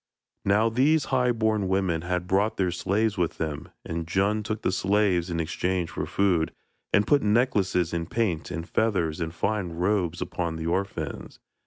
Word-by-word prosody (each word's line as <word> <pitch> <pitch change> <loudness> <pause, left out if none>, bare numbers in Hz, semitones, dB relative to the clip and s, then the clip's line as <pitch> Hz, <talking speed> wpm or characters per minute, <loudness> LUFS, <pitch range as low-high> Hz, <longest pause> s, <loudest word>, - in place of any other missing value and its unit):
Now 105 +3 +4
these 140 +6 +3
high 125 -1 +3
born 110 -3 +1
women 95 -4 +1
had 90 +1 -2
brought 100 +4 +1
their 90 -2 +1
slaves 100 +3 0
with 85 -2 0
them, 80 0 -4 0.2
and 80 0 -4
Djun 100 +5 +1
took 110 0 -4
the - - +2
slaves 95 -2 +1
in 85 -1 -2
exchange 85 +1 -1
for - - -3
food, 90 -5 +1 0.4
and 105 - +4
put 145 -1 +4
necklaces 105 -6 +2
and 85 0 -2
paint 95 -9 -1
and 85 +1 -5
feathers 90 -8 0
and 80 0 -2
fine 95 0 -2
robes 90 -1 0
upon 85 -2 -3
the 80 0 -5
orphans. 95 +4 -3
95 Hz, 170 wpm, -26 LUFS, 85-105 Hz, 0.4 s, Now